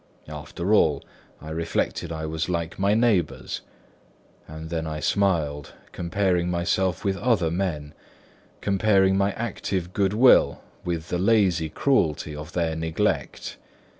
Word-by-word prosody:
After 75 +6 -3
all, 75 -9 +3 0.3
I 80 - -9
reflected, 80 0 -2
I 80 -1 -4
was 80 +2 -3
like 85 0 -3
my 100 +2 +3
neighbours; 110 -9 +1 0.9
and 80 +1 -8
then 80 -1 -2
I 75 -1 -4
smiled, 80 -8 0 0.2
comparing 90 0 0
myself 90 +2 0
with 95 -1 +1
other 105 -10 +1
men, 80 -5 -2 0.7
comparing 100 -1 +3
my 100 +1 +2
active 95 -5 -3
good 100 -1 +1
will 125 +4 +5 0.2
with 85 -1 -3
the 90 - -1
lazy 95 -6 +3
cruelty 75 - +1
of 75 +3 -8
their 85 -2 0
neglect. 80 0 -2
85 Hz, 130 wpm, -25 LUFS, 80-100 Hz, 0.9 s, will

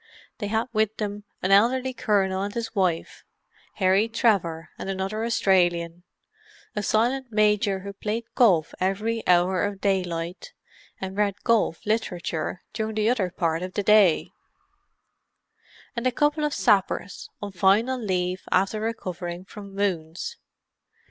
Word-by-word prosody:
They 205 - -2
had 220 +2 0
with 220 0 +1
them 205 -1 -4 0.2
an 185 - +1
elderly 250 +6 +4
colonel 195 -5 +1
and 200 +1 -4
his 230 -1 -3
wife; 185 -5 -1 0.5
Harry 195 +3 +3
Trevor 185 -9 +1
and - - -5
another 195 +3 -2
Australian; 175 -6 +2 0.7
a 210 - 0
silent 245 +6 +1
Major 210 -2 +2
who 200 +1 -7
played 215 +3 -3
golf 175 -10 +3
every 210 +5 0
hour 180 +1 +3
of 205 -1 -2
daylight, 180 -3 -2 0.5
and 190 0 -5
read 205 -1 0
golf 230 -8 +1
literature 180 -6 -2
during 220 0 -3
the 215 +1 +2
other 205 -7 0
part 165 -2 -1
of 185 0 -6
the 205 - 0
day; 205 -5 +4 1.6
and 235 +1 0
a - - +2
couple 295 +4 +1
of 295 - -1
sappers, 200 -3 +1
on 205 -1 -5
final 205 +8 +2
leave 185 -4 -1
after 195 +3 +2
recovering 180 -5 -4
from 200 -1 -11
wounds. 185 - -2
200 Hz, 135 wpm, -25 LUFS, 185-220 Hz, 1.6 s, elderly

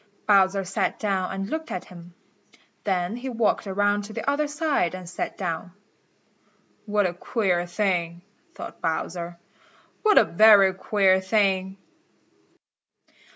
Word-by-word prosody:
Bowser 195 -1 +4
sat 190 +1 -2
down 195 -4 -1
and 195 0 -4
looked 320 0 -4
at 180 - -5
him. 175 -1 -14 0.7
Then 185 0 -1
he 260 +2 -5
walked 230 -3 0
around 205 +1 +1
to 215 - -10
the 225 - -6
other 290 +2 +1
side 295 - 0
and 185 -1 -9
sat 175 - -5
down. 175 -1 -4 1.1
"What 205 -1 +1
a 175 - -1
queer 180 -2 -1
thing," 175 -2 -1 0.3
thought - - -9
Bowser. 170 +1 -3 0.6
"What 425 -2 +4
a - - +8
very 200 0 +6
queer 190 -1 +2
thing." 190 -1 0
195 Hz, 130 wpm, -24 LUFS, 180-215 Hz, 1.1 s, a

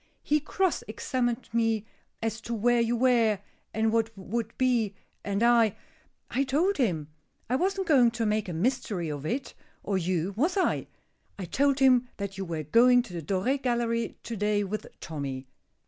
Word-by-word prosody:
"He 300 +1 +2
cross 370 +4 0
examined 240 +2 -2
me 225 -2 +1 0.4
as 225 0 -2
to 235 - -4
where 240 +2 +3
you 230 +1 +1
were, 235 -4 +3 0.3
and 220 0 +1
would 225 0 -2
be, 235 -6 +1 0.3
and 200 +2 -1
I 235 -3 +4 0.6
I 270 - +1
told 320 +9 +1
him. 165 - 0 0.4
I 250 - +1
wasn't 385 +5 0
going 265 -8 +5
to 230 0 -2
make 210 -2 0
a - - -3
mystery 195 - -1
of 145 0 -5
it, 260 - -3 0.3
or 195 -2 0
you, 180 +1 -1
was 325 - +1
I? 380 - +1 0.5
I 190 - -5
told 275 +9 +2
him 255 -2 +4
that 200 -1 -4
you 195 0 -4
were 165 -3 -3
going 245 - +5
to 190 - -11
the 170 - -4
Doré 195 - 0
Gallery 235 -2 -1
to 235 - -5
day 210 0 +1
with 205 +2 -4
Tommy. 140 -4 -5
230 Hz, 170 wpm, -28 LUFS, 195-255 Hz, 0.6 s, going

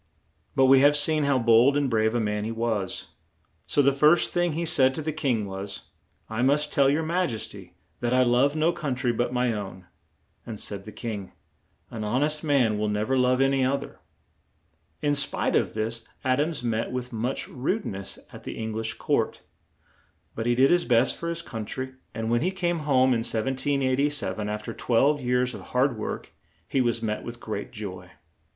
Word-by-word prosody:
] - - -41
But 135 - +5
we 135 0 +7
have 145 +2 +6
seen 150 0 +4
how 140 -1 +3
bold 120 +4 +5
and 145 -1 +1
brave 110 -1 +1
a - - +2
man 105 -1 -1
he 110 - -3
was, 115 -4 -2 0.6
so 145 - +3
the 140 +1 +4
first 150 +5 +4
thing 175 -2 +1
he 170 +2 -2
said 135 -4 +3
to - - -3
the 155 0 -2
king 130 -8 0
was: 95 +1 -7 0.4
"I 110 +1 -3
must 145 +3 +2
tell 140 -1 +4
your 150 +3 +1
Maj 170 -5 0
es 110 - -5
ty 95 -3 -12 0.3
that 120 -1 -1
I 130 0 +4
love 125 +4 +3
no 160 +2 +2
coun 145 -5 -3
try 125 -1 0
but 120 +1 -1
my 125 -1 +1
own"; 95 -3 -6 0.6
and 110 -3 -7
said 100 -1 -4
the 110 - -8
king: 105 -4 -6 0.6
"An 115 - -5
hon 120 +6 +1
est 150 +1 0
man 125 -8 +2
will 105 0 0
nev 105 +4 -1
er - - +4
love 125 +1 +3
an 135 0 +4
y 135 -1 +2
oth 140 +2 +1
er." - - -13 1.0
In 145 -1 +2
spite 140 -1 0
of - - +1
this, 115 +1 -2 0.2
Ad 130 +2 +2
ams 155 -4 -2
met 115 -1 -1
with 125 -1 -5
much 120 +4 -2
rude 165 - -2
ness 95 0 -6 0.2
at - - -11
the - - -6
Eng 110 0 -4
lish 110 +1 -3
court; - - -1 0.9
but 115 +1 -3
he 120 - +3
did 135 +2 +5
his 175 0 +4
best 125 +1 +3
for 170 - -4
his 170 0 -3
coun 110 -2 -5
try, 130 +4 -5 0.2
and 110 +1 -2
when 120 - +2
he 175 - +1
came 175 -3 -1
home 130 -1 +5
in 115 - +1
1787, 130 -3 0
af 105 0 -3
ter 115 - -5
twelve 135 +7 +2
years 125 0 +1
of - - -8
hard 125 0 +1
work, 110 - -5 0.4
he 135 - +1
was 120 -1 0
met 105 -1 -2
with 120 0 -7
great 105 -3 -5
joy. 95 -4 -7
125 Hz, 210 wpm, -26 LUFS, 110-140 Hz, 1.0 s, we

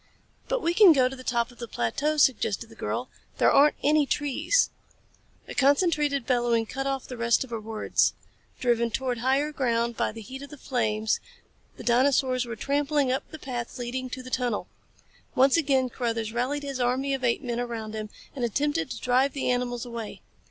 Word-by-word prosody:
"But - - -1
we 335 - +2
can 375 -2 +8
go 260 -3 +4
to 265 - -6
the 255 - -11
top 235 -1 0
of 245 - -19
the 235 - -5
plateau," 280 - -1
suggested 265 -5 +2
the - - -14
girl. - - -3 0.3
"There - - +4
aren't 295 +2 +5
any 295 0 +3
trees 295 - +1 0.4
" - - -35
A - - -7
concentrated 285 -2 +2
bellowing 240 -2 +2
cut 270 +4 -4
off 270 -1 -2
the 250 - -8
rest 235 +1 +2
of 260 - -13
her 230 - -3
words. 220 0 +1 0.5
Driven 235 -2 +2
towards 245 0 -2
higher 270 +4 +1
ground 235 -4 0
by - - 0
the 225 +1 -9
heat 265 +5 -8
of 280 - -9
the 300 - -11
flames, 220 -5 0 0.6
the - - -9
dinosaurs 255 0 +2
were 230 - -5
trampling 285 +2 +1
up 265 - -2
the 315 - -8
path 245 -5 -5
leading 255 +1 -4
to 255 +1 -6
the 255 - -10
tunnel. 245 -5 -1 0.7
Once 265 +1 +5
again 275 -5 +2
Carruthers 230 -3 -3
rallied 265 +5 -1
his 275 -2 -4
army 255 +3 +1
of 265 -1 -3
apemen 240 0 0
around 230 -3 -4
him 215 -1 -5 0.3
and 255 - -3
attempted 290 +6 0
to - - -5
drive 255 +2 +2
the 275 - -1
mammals 245 -1 -1
away. 235 -3 -7
255 Hz, 195 wpm, -27 LUFS, 235-280 Hz, 0.7 s, can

